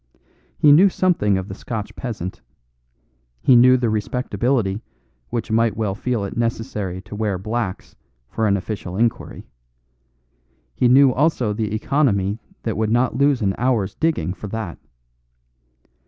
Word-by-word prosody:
He 150 - +5
knew 180 +7 +7
something 165 - +1
of 95 0 -4
the 95 - -7
Scotch 105 +1 -6
peasant; 105 -8 -6 1.0
he 130 - +5
knew 125 +2 +7
the 120 -1 0
respectability 110 -1 -1 0.5
which 115 -1 -3
might 115 -1 +2
well 105 -3 -1
feel 110 0 -2
it 100 - -6
necessary 110 -5 -3
to 105 +1 -9
wear 105 -3 -1
"blacks" 105 0 -4 0.3
for 110 - -1
an 100 -1 +2
official 95 -2 -5
inquiry; 115 +1 -1 1.3
he 120 - +2
knew 130 +1 +6
also 130 -6 +1
the 105 -1 -2
economy 110 -5 +1 0.2
that 110 -3 -2
would 110 0 0
not 120 +1 +1
lose 140 -2 +2
an 95 -1 +1
hour's 115 -6 +1
digging 160 - -1
for 100 +3 -8
that. 105 -4 -5
110 Hz, 140 wpm, -21 LUFS, 100-125 Hz, 1.3 s, knew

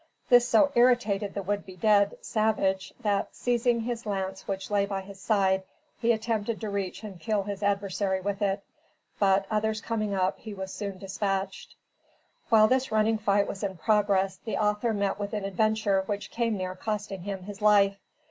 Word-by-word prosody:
This 245 0 +6
so 280 +6 +5
irritated 220 -5 +2
the 200 - -3
would 205 +2 -1
be 190 -1 -11
dead, 200 +2 +3
savage, 200 -3 0
that, 205 -2 -1
seizing 240 -1 +1
his 235 -1 -4
lance 190 -1 -3
which 195 0 -4
lay 200 -1 +2
by 195 -1 -3
his 195 0 -12
side, 190 -2 +2 0.4
he 235 0 +3
attempted 220 -1 -1
to 215 -2 -4
reach 200 +1 -3
and 195 -4 -8
kill 215 -1 0
his 200 0 -5
adversary 200 -1 0
with 200 +2 -3
it; 200 0 0 0.6
but, 195 -1 +3
others 215 0 0
coming 215 -2 -2
up, 185 -1 0
he 215 -2 -8
was 190 -1 -6
soon 200 -2 -5
dispatched. 195 0 -3 0.7
While 215 -1 +6
this 260 +2 +1
running 220 0 +2
fight 200 -1 +2
was 195 - -6
in 190 -2 -3
progress, 195 0 +2
the 220 - -4
author 210 +2 +1
met 200 -1 -1
with 205 +1 -4
an 205 -2 -2
adventure 205 0 +1
which 205 -1 -4
came 230 -2 0
near 185 -1 -3
costing 205 -1 -4
him 195 0 -5
his 205 +1 -9
life. 200 -2 +4
205 Hz, 180 wpm, -28 LUFS, 195-215 Hz, 0.7 s, This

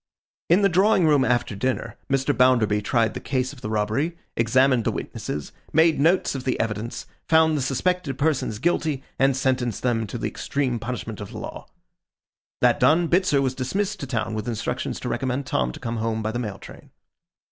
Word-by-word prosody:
In 180 +5 +5
the - - +7
drawing 190 0 +3
room 145 -4 +4
after 120 -4 0
dinner, 115 +1 -2
Mr. 135 +1 +1
Bounderby 120 -5 +3
tried 115 +1 +1
the - - -5
case 130 0 -2
of 130 - -14
the 105 - -4
robbery, 110 +11 -1 0.2
examined 130 +1 +3
the - - +1
witnesses, 75 -1 -5 0.2
made 160 0 +4
notes 170 +6 +3
of 135 -2 -5
the 130 - -1
evidence, 110 +1 -3 0.2
found 160 -1 +5
the 145 - 0
suspected 140 +2 -1
persons 140 -7 0
guilty, 155 0 0 0.2
and 135 -1 +3
sentenced 130 -4 0
them 115 -3 0
to - - -5
the - - -4
extreme 130 -4 -2
punishment 110 -3 -5
of 100 - -7
the - - -9
law. - - -7 0.9
That - - +4
done, 165 +1 +4
Bitzer 170 -6 +3
was 130 -1 0
dismissed 190 +11 -2
to 140 - -5
town 115 -3 -2
with 110 0 -4
instructions 120 +2 -3
to - - -4
recommend 130 +2 -2
Tom 65 - 0
to - - -10
come 115 0 -4
home 110 0 -1
by 110 - -1
the 120 - -3
mail 105 -5 -4
train. - - -13
130 Hz, 190 wpm, -24 LUFS, 115-150 Hz, 0.9 s, the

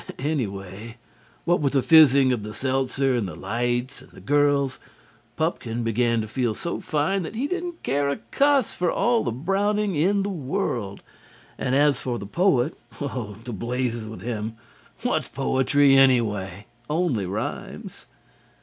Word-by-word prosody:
Anyway, 110 -6 -4 0.5
what 175 +2 +3
with 140 -2 +1
the 135 -2 +2
phizzing 140 -5 +6
of 120 - -2
the 105 0 -7
seltzer 135 +1 0
and 115 -5 0
the 85 - -7
lights 120 +3 -2
and - - -16
the - - -13
girls, 145 -2 +2 0.6
Pupkin 120 -8 -2
began 115 0 +1
to 110 - -5
feel 120 -1 -1
so 170 - -4
fine 155 +6 0
that 175 - -6
he 250 +5 -1
didn't 350 +1 -4
care 140 +1 +1
a 140 - 0 0.2
cuss 280 -4 +3
for 175 -1 0
all 240 -1 +2
the 120 - -1
Browning 200 - 0
in 195 +6 +2
the 200 - -2
world, 130 - -3 0.5
and 130 - -1
as 145 -2 +3
for 125 -2 -2
the 100 - -7
poet 150 - +2 0.2
oh, 125 -7 -4
to 120 - -5
blazes 120 +1 -2
with 110 - -8
him! 110 -1 -4 0.5
What's - - 0
poetry, 135 +1 +3
anyway? 105 -8 +2 0.2
only 150 - 0
rhymes. 100 +4 -6
130 Hz, 155 wpm, -24 LUFS, 115-160 Hz, 0.6 s, phizzing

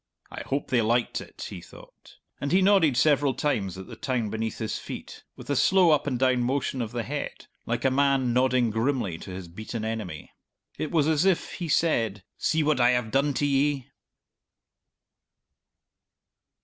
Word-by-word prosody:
"I - - -6
hope 140 +1 -3
they 125 -2 +3
liked 115 +2 +1
it!" - - -9
he - - -7
thought, - - -16 0.2
and 140 - -3
he 185 +2 +4
nodded 185 -10 +4
several 145 -1 +3
times 100 -11 -1
at 95 - -8
the - - -10
town 125 -8 -2
beneath 110 0 -3
his 110 -2 -3
feet, - - -9
with - - -12
a 145 - 0
slow 185 +4 +5
up 150 -1 +2
and 130 -3 0
down 130 -1 +2
motion 130 +1 -1
of 115 -2 -4
the 120 -1 -3
head, - - -5 0.2
like - - -2
a 135 - +4
man 135 -2 +2
nodding 125 -2 +2
grimly 110 - -1
to - - -10
his 90 -1 -7
beaten 110 +5 -6
enemy. 105 -9 -5 0.5
It 155 - -2
was 155 -3 +2
as 160 0 +2
if 190 -3 +1
he 175 -3 -5
said, 115 - +1
"See 160 -1 +1
what 150 -3 +2
I 120 0 +5
have 125 -3 0
done 140 +1 +1
to 145 - +1
ye!" 140 -1 0
130 Hz, 180 wpm, -26 LUFS, 115-145 Hz, 0.5 s, slow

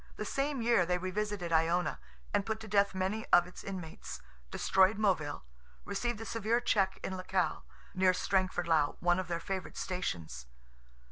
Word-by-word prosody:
The 215 - -4
same 275 +1 -1
year 230 -5 +4
they 180 +1 +1
revisited 185 -1 -2
Iona; 165 +2 +2 0.3
and 205 - +2
put 220 +1 -3
to 220 - -8
death 200 -1 +2
many 190 +4 -1
of 175 - +6
its 180 - -11
inmates; 180 - -6 0.3
destroyed 190 - +3
Moville; 180 - 0 0.4
received 225 +3 -2
a 225 - -6
severe 230 +1 +1
check 195 -5 +1
in 190 - -3
Lecale, 185 -3 -1 0.3
near 185 0 +4
Strangford 185 -1 0
lough 155 -3 +2
(one 175 +1 +3
of 185 - -3
their 170 -1 -2
favourite 190 +1 -5
stations). 80 - -4
185 Hz, 160 wpm, -32 LUFS, 175-210 Hz, 0.4 s, of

